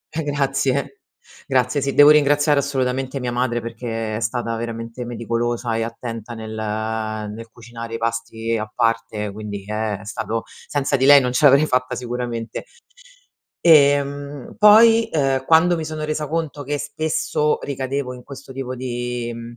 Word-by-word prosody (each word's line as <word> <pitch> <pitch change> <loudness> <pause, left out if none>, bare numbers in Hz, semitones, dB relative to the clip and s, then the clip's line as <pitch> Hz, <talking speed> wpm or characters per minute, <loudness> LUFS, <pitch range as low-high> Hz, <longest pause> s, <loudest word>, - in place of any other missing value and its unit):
eh, 160 - -1
grazie! 140 - -1 0.5
Grazie 130 +1 +1
sì, 140 0 -1
devo 145 +1 +8
ringraziare 145 0 +4
assolutamente 130 -1 -1
mia 125 -1 -2
madre, 120 -1 -1
perché 115 -2 -4
è - - -3
stata 115 0 -2
veramente 115 +1 -5
meticolosa 120 0 -2
e 115 - 0
attenta 115 0 -6
nel 110 -1 -7
nel 110 0 -4
cucinare 115 0 -9
i - - -2
pasti 115 0 -2
a 110 0 -4
parte 115 -3 -1
quindi 100 -1 -7
Eh! 105 -1 -2
È 105 - -13
stato 115 +1 -3 0.2
senza 140 -1 0
di 130 - +1
lei, 140 0 +8
non 125 -1 -1
ce 125 +4 +2
l'avrei 140 +2 +6
fatta 130 -2 0
sicuramente. 120 -2 -4 1.0
Ehm, 145 -3 +3
poi, 225 +2 +7
uhm, 135 -3 +1
quando 165 +2 +5
mi 160 - -3
sono 155 0 -5
resa 155 0 -2
conto 155 -2 -3
che 145 +1 -2
spesso 150 0 -1
ricadevo 135 -1 -3
in 125 -1 -11
questo 135 -1 -10
tipo 130 -1 -5
di, 120 -1 -4
mhmm, 115 0 -9
125 Hz, 155 wpm, -21 LUFS, 115-140 Hz, 1.0 s, devo